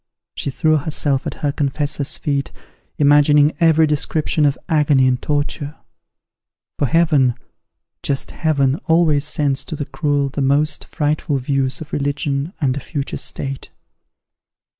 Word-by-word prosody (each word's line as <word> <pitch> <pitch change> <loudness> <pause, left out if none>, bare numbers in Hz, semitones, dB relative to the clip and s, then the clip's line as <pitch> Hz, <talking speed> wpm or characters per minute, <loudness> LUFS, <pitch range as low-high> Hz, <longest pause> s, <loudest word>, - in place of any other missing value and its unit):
She - - -3
threw 155 +4 +2
herself 145 -2 -1
at - - -5
her 145 - +2
confessor's 145 +1 -2
feet, 140 -2 -2 0.5
imagining 145 +1 +5
every 160 -1 +5
description 150 +1 0
of 140 - 0
agony 150 -5 +3
and 125 -1 0
torture; 145 0 -2 1.0
for 140 - +2
Heaven 150 -6 +3 0.7
just 135 -1 -2
Heaven, 140 -4 +1
always 160 -3 +3
sends 145 -2 0
to - - -5
the 145 - -4
cruel 145 -3 -1
the 140 +1 -4
most 145 +3 +1
frightful 150 -2 -1
views 135 0 -1
of 155 - -10
religion 140 +1 -1
and 135 -5 +1
a - - -3
future 140 +1 -4
state. 135 -1 -4
145 Hz, 135 wpm, -19 LUFS, 140-155 Hz, 1.0 s, imagining